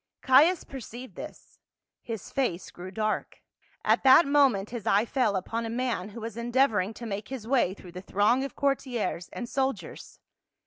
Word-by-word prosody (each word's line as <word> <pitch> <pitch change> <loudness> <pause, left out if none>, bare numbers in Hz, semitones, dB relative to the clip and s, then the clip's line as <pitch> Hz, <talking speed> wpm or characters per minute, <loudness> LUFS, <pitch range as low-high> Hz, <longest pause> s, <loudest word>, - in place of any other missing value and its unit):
Caius 300 +7 +5
perceived 255 -1 -9
this; - - -11 0.4
his 225 -4 -7
face 220 -10 -2
grew 180 +1 -9
dark. 215 +2 -3 0.4
At - - +3
that 270 +5 +8
moment 270 -9 +3
his 235 -4 -6
eye 205 +3 +4
fell 235 -5 +1
upon 225 +5 -2
a 225 - -4
man 230 -5 -2
who 225 +2 -9
was 225 -1 -6
endeavoring 235 -4 +1
to 235 - -8
make 205 -2 -4
his 255 -5 -7
way 240 -8 +2
through 180 -3 -13
the 180 +1 -8
throng 210 +7 +2
of 275 - -6
courtiers 255 -10 -1
and 240 - -5
soldiers. 270 +1 -3
235 Hz, 170 wpm, -28 LUFS, 205-265 Hz, 0.4 s, that